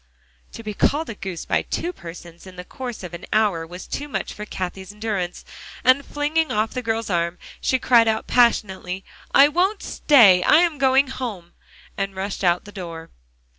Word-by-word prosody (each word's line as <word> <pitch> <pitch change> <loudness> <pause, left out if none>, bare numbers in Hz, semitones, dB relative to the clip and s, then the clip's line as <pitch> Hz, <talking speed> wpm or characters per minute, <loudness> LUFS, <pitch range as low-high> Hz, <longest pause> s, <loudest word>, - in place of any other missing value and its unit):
To 230 - -9
be 215 -1 -4
called 295 +7 +1
a - - -5
goose 190 -5 -6
by - - +1
two 355 - -3
persons 170 - -11
in 185 - -12
the 180 - -7
course 245 -3 -7
of 175 -1 -8
an 170 - -8
hour 200 -7 +1
was 180 +2 -9
too 290 - -5
much 290 - -4
for 210 - -7
Cathie's 190 +1 -5
endurance, 205 -4 -4 0.4
and 255 +2 +4
flinging 300 +3 -1
off 215 +1 0
the 255 - -3
girl's 225 -2 -2
arm, 170 0 0 0.2
she 260 - +2
cried 235 -2 +4
out 220 0 0
passionately, 195 -6 +1 0.3
"I 275 - +7
won't 365 +7 0
stay; 205 -11 +5
I'm 325 -1 +4
going 265 0 +4
home!" 215 -10 -6 0.4
and 195 -1 -3
rushed 195 +1 -4
out 175 -1 +2
the 205 - -11
door. 170 -4 -8
210 Hz, 180 wpm, -22 LUFS, 180-260 Hz, 0.4 s, I